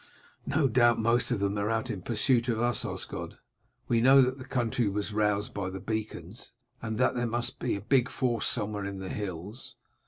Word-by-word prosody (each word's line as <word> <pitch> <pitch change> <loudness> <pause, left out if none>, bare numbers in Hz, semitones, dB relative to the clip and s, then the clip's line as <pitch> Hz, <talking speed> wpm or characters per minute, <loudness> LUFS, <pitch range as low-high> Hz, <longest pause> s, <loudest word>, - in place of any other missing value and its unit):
"No 140 0 +2
doubt 120 -1 +4
most 115 +2 +2
of 120 - 0
them 100 0 0
are 100 +1 0
out 115 +2 -1
in 100 -4 -5
pursuit 120 +4 +1
of 115 -2 0
us, 120 +1 +1
Osgod; - - -5 0.5
we 115 -1 +2
know 135 +3 +7
that 130 +2 -1
the 130 - -8
country 120 -4 0
was 105 +1 -3
roused 105 -1 0
by 100 -2 -3
the 95 +1 -6
beacons, 110 -2 -5 0.3
and 110 -1 -3
that 125 - +3
there 120 -1 -1
must 120 +1 -3
be 120 - -1
a 100 - -5
big 125 +2 +2
force 120 -5 0
somewhere 105 -3 -2
in 100 0 -5
the 95 -1 -6
hills. 100 +4 -6
115 Hz, 200 wpm, -29 LUFS, 105-120 Hz, 0.5 s, know